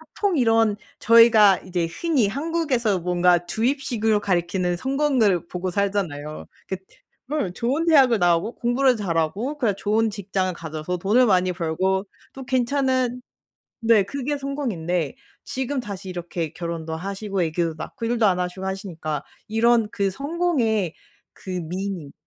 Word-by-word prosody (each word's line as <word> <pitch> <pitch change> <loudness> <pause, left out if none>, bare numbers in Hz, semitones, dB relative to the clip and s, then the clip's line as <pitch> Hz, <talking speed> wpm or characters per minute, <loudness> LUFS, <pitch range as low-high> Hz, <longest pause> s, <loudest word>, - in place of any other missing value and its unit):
보통 395 -6 +1
이런 225 -3 +3 0.2
저희가 225 -4 +7
이제 175 -2 -2
흔히 270 - +1
한국에서 275 - 0
뭔가 175 0 +2
주입식으로 225 -3 0
가리키는 180 -1 0
성공을 260 - +1
보고 180 +1 -3
살잖아요. 175 -7 -2 0.2
긋 190 -1 -3 0.5
음 205 -13 -1
좋은 270 - -1
대학을 260 -8 +5
나오고 175 +5 +2
공부를 245 +1 +2
잘하고 200 - -1
그냥 225 -8 +1
좋은 220 +2 +1
직장을 195 -2 -2
가져서 160 +1 -5
돈을 210 +8 +3
많이 185 -4 +2
벌고 190 +4 0 0.3
또 265 -1 -9
괜찮은 255 -1 0 0.6
네 225 -3 +5
그게 280 +5 -3
성공인데. 180 - -2 0.3
지금 265 +1 -3
다시 200 -4 -7
이렇게 175 -3 -4
결혼도 165 -2 -5
하시고 195 +3 -4
아기도 165 0 0
낳고 230 - -7
일도 235 -1 +1
안 185 -3 +3
하시고 180 +1 -3
하시니까 170 -6 -4 0.2
이런 230 0 +3
그 200 -1 0
성공의 265 - 0 0.4
그 190 - -11
meaning 180 -2 -4
200 Hz, 325 characters per minute, -23 LUFS, 180-245 Hz, 0.6 s, 저희가